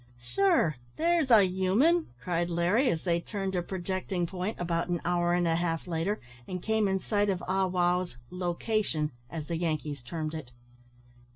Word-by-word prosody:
"Sure, 175 - +2 0.2
there's 335 -3 +2
a 220 -4 +8
human!" 195 - +3 0.2
cried 175 -1 0
Larry, 180 +10 +2
as 160 - -1
they 170 -2 +2
turned 195 0 -3
a 180 - +1
projecting 185 0 -2
point, 185 +4 -4
about 170 -1 0
an 175 -1 0
hour 175 0 +2
and 175 -1 +2
a 165 - +2
half 165 -2 -1
later, 175 +4 -1 0.3
and 180 - -3
came 220 -1 +2
in 190 0 +1
sight 205 +1 +1
of 185 -2 -1
Ah 190 +1 +2
wow's 180 -4 +1
"lo 180 -1 -2
cation," 180 -9 0 0.2
as 160 -3 -5
the 165 +1 -2
Yankees 155 -4 -2
termed 155 +4 -4
it. 155 -6 -6
180 Hz, 175 wpm, -29 LUFS, 170-195 Hz, 0.3 s, a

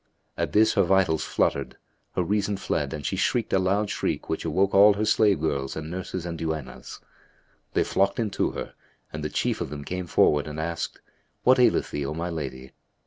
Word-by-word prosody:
At - - -2
this 110 +1 +5
her 100 - +3
vitals 90 -4 +2
fluttered, - - -1 0.4
her 90 - +1
reason 100 +2 0
fled - - -2
and 75 -3 -6
she - - -1
shrieked 120 -2 0
a 95 - +4
loud 100 +3 +1
shriek - - -2
which 80 - -2
awoke 95 +5 +1
all 100 +1 +7
her 105 +2 0
slave 105 -4 +3
girls 70 -3 -2
and 80 +1 -6
nurses 90 -1 -5
and 85 -2 -5
duennas. 80 -5 -5 0.7
They - - +3
flocked 100 0 +1
in 110 -3 -1
to - - 0
her; - - -6 0.4
and 75 0 -5
the 75 - -2
chief - - -1
of - - -3
them 75 0 -6
came 90 -1 -4
forward 75 -2 +3
and 75 0 -6
asked, 85 +1 -3 0.4
"What 130 +1 +5
aileth 125 - +3
thee, 75 - -2
O 75 - -4
my 85 +2 -3
lady?" 65 -5 -6
85 Hz, 200 wpm, -26 LUFS, 75-100 Hz, 0.7 s, all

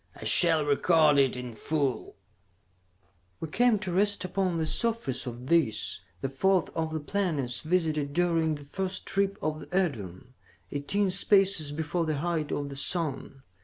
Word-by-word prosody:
I - - -11
shall 165 -4 +6
record 150 0 +3
it 135 -2 +2
in 125 -1 -7
full: 140 +2 -2 1.2
"We 160 - -5
came 240 +5 +3
to 195 -3 -4
rest 200 +1 0
upon 185 -1 -1
the 160 - -1
surface 155 - -2
of 120 +1 -7
this, 140 -8 0 0.2
the - - -1
fourth 185 +8 +1
of 160 -1 -2
the 160 - -2
planets 145 -8 -2
visited 155 -4 0
during 165 -1 +1
the 145 - -10
first 185 +6 -4
trip 195 0 0
of 155 0 -2
the - - -10
Edorn, 125 - -3 0.4
eighteen 185 +8 0
spaces 195 -5 +3
before 160 +3 -2
the 155 -2 -1
height 160 -1 -2
of 145 -1 -3
the 140 - -8
sun. 140 -3 -2
160 Hz, 160 wpm, -28 LUFS, 140-185 Hz, 1.2 s, shall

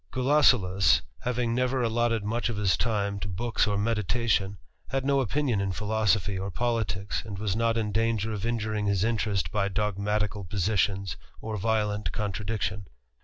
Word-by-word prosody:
Gulosulus, 100 - +4 0.2
having 120 -1 -1
never 125 +1 +1
allotted 115 -1 +1
much 115 +3 -1
of 115 - -3
his 100 -3 +2
time 100 -3 -1
to 100 - -4
books 105 +3 0
or 100 -1 0
meditation, 105 -1 0 0.3
had 135 0 -1
no 140 0 +3
opinion 130 -3 0
in 95 -1 -1
philosophy 105 -2 +1
<^ 95 +1 -3
politicks, 110 -5 -1
and 105 -3 -7
was 100 -1 -1
not 115 0 +1
in 110 -2 -1
danger 110 0 0
of 105 -2 -4
injuring 110 -2 -1
his 100 -2 +1
interest 110 -3 0
by 100 -2 +1
dogmatical 105 +1 -1
positions, 95 -2 0 0.2
or 110 0 -4
violent 105 0 0
contradiction. 105 -1 -3
105 Hz, 155 wpm, -27 LUFS, 100-115 Hz, 0.3 s, Gulosulus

